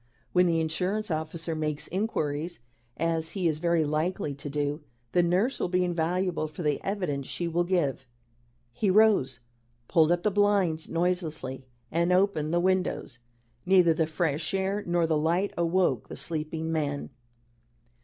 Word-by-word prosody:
When 180 0 +5
the 165 -1 +2
insurance 180 +6 -1
officer 160 +1 -3
makes 150 -1 -2
inquiries, 170 -5 -2 0.4
as 165 -1 -1
he 180 -3 +1
is 155 -2 0
very 170 -1 +2
likely 155 0 -1
to 140 +1 -7
do, 145 +1 -2 0.3
the 175 - +4
nurse 185 +10 +1
will - - 0
be 180 0 +1
invaluable 175 0 0
for 155 +3 -7
the 150 -2 0
evidence 180 -9 -2
she 175 - -2
will 170 +1 +1
give." 160 -8 0 0.7
He 205 - 0
rose, 185 - +4 0.5
pulled 160 -1 +4
up 175 0 +1
the 210 - +2
blinds 195 -6 +2
noiselessly, 160 -7 -2 0.2
and 170 +2 +1
opened 180 -5 +2
the 175 - +2
windows. 185 -9 0 0.4
Neither 180 -3 +5
the 160 0 0
fresh 160 +1 -1
air 195 +2 -1
nor 175 -1 +2
the 160 -2 +1
light 170 +6 +1
awoke 170 - +1
the - - -7
sleeping 160 0 -3
man. 145 -3 -2
170 Hz, 155 wpm, -28 LUFS, 155-180 Hz, 0.7 s, When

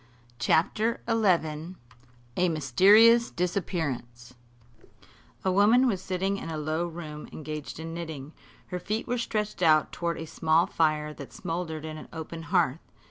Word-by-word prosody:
CHAPTER 210 - +2
XI 180 -7 +1 0.6
A 180 0 +2
MYSTERIOUS 205 - +5
DISAPPEARANCE 145 -10 -3 1.1
A 190 - +3
woman 215 +7 +5
was 200 -7 0
sitting 190 +1 -1
in 165 - -6
a 160 - -4
low 155 +3 -1
room, 155 -3 -8
engaged 155 0 -6
in 165 0 -6
knitting. 160 -3 -7 0.4
Her 180 - -3
feet 215 +5 -3
were 245 0 -1
stretched 210 -4 -2
out 155 -3 +4
toward 170 -1 -2
a 160 - -5
small 160 +2 +2
fire 155 -4 0
that 140 -2 -10
smouldered 165 -2 -4
in 155 0 -6
an - - -11
open 165 0 -7
hearth. 170 -6 +2
165 Hz, 140 wpm, -27 LUFS, 155-190 Hz, 1.1 s, MYSTERIOUS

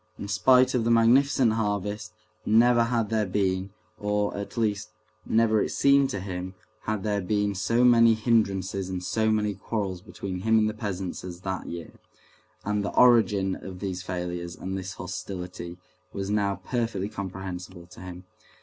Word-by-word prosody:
In 100 - -6
spite 125 +6 +4
of 125 -3 +1
the 115 - 0
magnificent 120 +1 +4
harvest, 105 0 -2 0.3
never 120 +2 +4
had 115 -2 -1
there 110 -2 +1
been, 95 0 0 0.3
or, 105 0 0
at 100 +3 -6
least, 110 -1 0 0.4
never 110 -1 +3
it - - -1
seemed 140 -1 +4
to 100 - -3
him, 95 0 -5 0.3
had 110 -3 -2
there 105 -1 0
been 105 +2 0
so 115 +6 +1
many 115 -2 +6
hindrances 100 -4 0
and 90 -1 -4
so 110 +4 +1
many 105 -1 +1
quarrels 95 -3 -4
between 95 -1 -6
him 110 +4 +3
and 110 -1 +3
the 110 - -2
peasants 100 -4 -4
as 90 -1 -8
that 95 0 -4
year, 85 -1 -7 0.7
and 105 0 0
the 100 - -4
origin 105 -6 +4
of 95 -1 -9
these 95 -2 -4
failures 90 -1 -4
and 95 +1 -5
this 95 -1 -5
hostility 90 -2 -6 0.3
was 100 0 -4
now 100 -2 +1
perfectly 115 -6 -1
comprehensible 95 -2 -7
to 90 - -15
him. 90 0 -9
100 Hz, 165 wpm, -26 LUFS, 95-110 Hz, 0.7 s, many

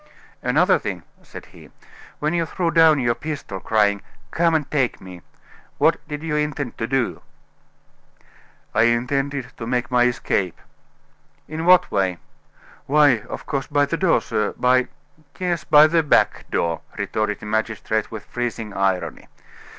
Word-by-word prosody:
"Another - - +3
thing," - - -5 0.2
said - - -11
he. - - -15 0.5
"When 150 +2 -1
you 170 -1 0
threw 170 -1 -1
down 160 -1 +5
your 120 -2 +1
pistol, 125 -6 -6
crying, 100 -1 +1 0.3
'Come 165 0 +2
and 150 -3 -1
take 135 -5 0
me,' 90 -2 -11 0.6
what - - +3
did 150 +1 -6
you 160 -2 -2
intend 150 -4 -2
to 115 - -2
do?" 135 -2 -1 1.5
"I 110 - +4
intended 135 +3 -1
to 115 - -6
make 125 0 -1
my 125 -1 +4
escape." 100 -7 -1 0.9
"In 160 +2 -5
what 180 0 +6
way?" 95 -3 0 0.7
"Why, 145 -4 +4
of - - -7
course, 135 -3 -3
by 145 0 +2
the 165 - -2
door, 165 -8 +2
sir 105 -1 -2
by 125 0 +3 0.2
" 150 -1 -29
"Yes, 175 -5 -2
by 150 0 +7
the 165 +1 +3
back 150 - +1
door," 85 -2 -1 0.2
retorted 110 -1 -2
the - - -10
magistrate, 110 0 -1
with 110 -2 -8
freezing 115 -3 -4
irony. 95 -2 -1
130 Hz, 150 wpm, -22 LUFS, 110-150 Hz, 1.5 s, by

